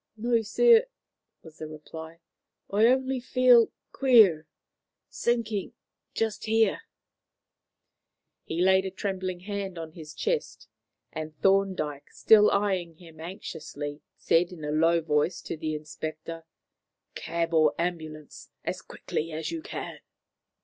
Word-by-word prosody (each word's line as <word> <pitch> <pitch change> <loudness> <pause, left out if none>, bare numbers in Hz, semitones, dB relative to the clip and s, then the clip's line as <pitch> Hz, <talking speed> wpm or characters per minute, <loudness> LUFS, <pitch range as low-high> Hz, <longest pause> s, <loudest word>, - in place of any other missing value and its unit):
"No, 230 +1 +1
sir," 465 - +5 0.6
was 160 -1 -15
the 155 - -5
reply; 160 +2 -10 0.5
"only 260 +6 +3
I - - -3
feel 245 -2 +5 0.2
queer 215 - +5 0.6
sinking 225 -4 -1 0.4
just 220 -2 -1
here." 225 0 +2 1.6
He 165 +2 -3
laid 190 0 +4
a - - -2
trembling 185 -1 -4
hand 200 -2 -5
on 165 -1 -6
his 155 -2 -11
chest, 475 0 -2 0.5
and 155 -1 -6
Thorndyke, 190 -8 +1
still 210 -1 +5
eyeing 190 -5 0
him 165 -1 -15
anxiously, 155 -4 -7 0.2
said 170 +2 +2
in 160 -4 -8
a 150 - -2
low 165 +2 +3
voice 155 +2 0
to - - -4
the 155 0 -3
inspector: 155 +2 -7 0.7
"Cab 170 0 -3
or 155 -2 +4
ambulance, 155 -4 -5 0.2
as - - -3
quickly 165 +2 -5
as 160 +1 -4
you 330 -1 -4
can." - - -7
175 Hz, 120 wpm, -27 LUFS, 155-215 Hz, 1.6 s, sir